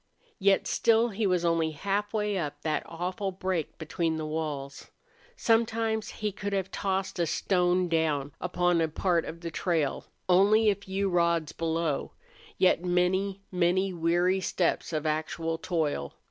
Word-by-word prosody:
Yet 195 0 +3
still 230 +1 +3
he 210 0 -1
was 180 -2 +1
only 165 -1 +2
halfway 205 +4 -1
up 145 -5 -4
that 155 -1 0
awful 180 +4 -3
break 185 -4 -3
between 160 0 -1
the 155 -1 -3
walls. 150 -3 -4 0.5
Sometimes 225 - +1
he 210 -1 -3
could 200 +1 -4
have 195 -1 -1
tossed 190 -1 -2
a 170 - +2
stone 180 0 +1
down 155 -4 0
upon 175 -1 +1
a 160 - +2
part 170 +1 0
of 165 +1 -8
the 170 -1 -5
trail, 160 -4 -1 0.2
only 205 +4 +5
a - - 0
few 195 0 -2
rods 170 -3 +1
below, 165 -2 -2 0.4
yet 180 -2 +3
many, 185 +2 +1
many 185 +1 +1
weary 175 +3 +2
steps 175 -2 0
of 155 -1 -2
actual 160 +1 -2
toil. 150 - -2
180 Hz, 145 wpm, -28 LUFS, 165-195 Hz, 0.5 s, only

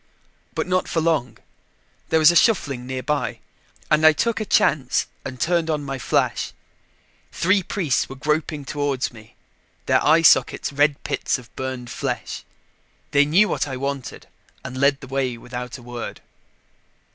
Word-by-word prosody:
But - - -1
not 185 0 0
for 165 - 0
long 155 -8 0 0.7
there 160 - +3
was 155 +1 +7
a - - -2
shuffling 140 - +2
nearby 130 +1 -2 0.5
and 155 0 +4
I 155 0 +8
took 230 +8 0
a - - -2
chance 135 -9 +2 0.2
and 130 -1 -7
turned 170 -1 +1
on 150 -2 -1
my 135 -1 -4
flash. - - 0 0.8
Three 190 +3 +2
priests 170 -7 -1
were 135 - -7
groping 150 +1 -1
toward 145 -4 -2
me, 110 -1 -15 0.5
their - - +3
eye 160 +2 +5
sockets 145 - +4
red 145 0 +2
pits - - -1
of 120 -2 -16
burned 130 -2 -5
flesh. - - -4 0.7
They 145 0 +5
knew 180 +9 +4
what - - -1
I 130 -2 -4
wanted 140 0 -4 0.4
and 130 - -6
led 140 +1 +2
the 135 - -9
way 130 -2 -1
without 125 +1 -7
a 125 - -14
word. 120 -1 -7
140 Hz, 155 wpm, -22 LUFS, 130-155 Hz, 0.8 s, I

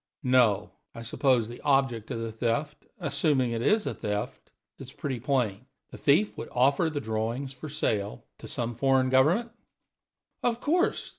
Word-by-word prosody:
"No. 120 -6 +3 0.2
I 115 - -7
suppose 120 -1 +1
the 120 +1 -10
object 135 -6 +1
of 125 - -3
the 115 0 -4
theft 120 +7 -2
assuming 145 - +2
it 115 -1 -2
is 210 - +2
a - - -2
theft 105 -1 -4 0.3
is - - -9
pretty 130 -4 -4
plain: 125 -3 -1 0.2
the - - -9
thief 170 +10 +3
would - - -6
offer 140 +6 +3
the 150 -2 -3
drawings 115 +3 -3
for 150 +4 -8
sale 105 - -2 0.2
to - - -9
some 120 0 -3
foreign 130 +1 +2
government?" 170 - +3 0.9
"Of 235 -1 0
course. 345 +7 0
130 Hz, 160 wpm, -28 LUFS, 115-145 Hz, 0.9 s, No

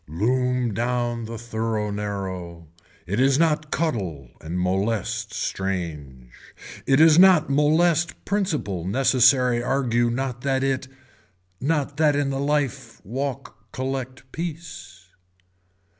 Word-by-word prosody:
Loom 125 +7 0
down 120 0 -1
the 115 +1 -6
thorough 110 -2 -2
narrow. 95 -5 -5 0.4
It 100 +5 -2
is 135 +1 +4
not 155 -1 +1
cuddle 95 - -2
and 85 +3 -4
molest 95 +3 -1 0.3
change. 75 -10 -5 0.6
It 135 +1 +4
is 160 +1 +7
not 180 -6 +6
molest 160 +3 +2
principal 155 - -1
necessary 125 +3 +3
argue 120 -2 +1
not 125 0 -3
that 135 -1 0
it, 130 -1 -1 0.7
not 145 +1 -1
that 150 -2 +3
in 140 -1 0
life 135 -4 -2
walk 135 +5 -5
collect 130 -1 -4
piece. 150 - -7
125 Hz, 110 wpm, -24 LUFS, 100-140 Hz, 0.7 s, is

